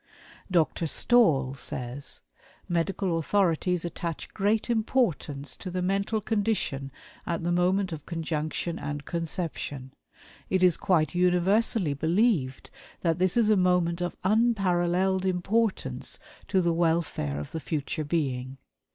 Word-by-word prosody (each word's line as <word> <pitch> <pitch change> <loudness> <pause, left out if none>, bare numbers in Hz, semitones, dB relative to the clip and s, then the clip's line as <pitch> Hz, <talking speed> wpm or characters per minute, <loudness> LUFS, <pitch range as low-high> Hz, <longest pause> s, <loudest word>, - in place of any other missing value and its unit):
Dr. 170 -2 +1
Stall 155 - +3
says: 130 +1 -5 0.5
"Medical 175 0 0
authorities 180 -1 +1
attach 170 -1 -5
great 210 +2 +1
importance 215 - 0
to 185 - -6
the 180 0 -2
mental 200 +3 0
condition 205 - -1 0.4
at 170 0 -2
the 175 - 0
moment 185 +2 +2
of 155 -3 -7
conjunction 165 0 -3
and 145 0 -5
conception. 160 -5 -4 0.6
It 185 -1 +2
is 180 -3 +5
quite 165 -4 +1
universally 180 0 +3
believed 160 - +1 0.3
that 165 -1 +1
this 185 +4 +2
is 220 -2 +4
a - - +6
moment 180 -2 +2
of 175 - -3
unparalleled 190 -4 +2
importance 190 +4 -1 0.3
to 190 - +2
the 170 -1 +2
welfare 165 - 0
of 75 - -7
the 160 - -3
future 155 +1 -3
being. 135 -4 -2
175 Hz, 125 wpm, -27 LUFS, 155-190 Hz, 0.6 s, a